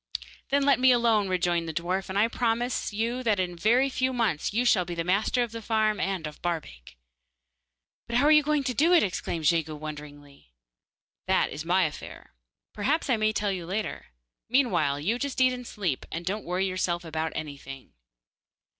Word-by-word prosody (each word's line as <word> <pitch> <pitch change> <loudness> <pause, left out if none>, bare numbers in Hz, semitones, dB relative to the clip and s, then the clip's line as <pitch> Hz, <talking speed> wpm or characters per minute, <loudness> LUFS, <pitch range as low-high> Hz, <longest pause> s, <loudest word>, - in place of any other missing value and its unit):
'Then 280 +1 +2
let 280 -2 +4
me 260 0 +6
alone,' 230 -4 +3
rejoined 175 -2 0
the - - -4
dwarf, 180 +4 -2
'and 190 - -3
I 215 +3 +4
promise 235 +1 -1
you 230 +4 -2
that 220 -5 +1
in 180 -1 -1
a - - -11
very 235 +9 +3
few 260 -1 0
months 220 -11 0
you 235 +4 0
shall 195 -6 +4
be 175 0 -6
master 195 +8 +1
of 235 - -5
the 230 0 -6
farm 215 -1 +1
and 190 -4 -2
of 150 -1 -8
Barbaik.' 100 - -5 1.1
'But 235 - -3
how 265 - +3
are 300 - +6
you 300 0 +7
going 300 -1 0
to 255 - -1
do 320 +8 +3
it?' 345 - +6
exclaimed 170 -4 -3
Jegu 160 -1 +2
wonderingly. 145 - -10 0.7
'That - - +2
is 150 +2 -6
my 185 +2 +3
affair. 150 - -6 0.4
Perhaps 275 +7 0
I 240 - +3
may 215 0 +2
tell 205 -1 -1
you 180 -3 -5
later. 210 +4 -4 0.4
Meanwhile 230 - +2
you 220 +10 0
just 280 -1 -3
eat 255 0 +4
and 250 -1 -7
sleep, 180 - -3
and 165 +2 -5
don't 205 +4 -3
worry 180 +2 0
yourself 180 -2 -1
about 160 0 -3
anything. 140 -3 -8
195 Hz, 190 wpm, -27 LUFS, 165-240 Hz, 1.1 s, you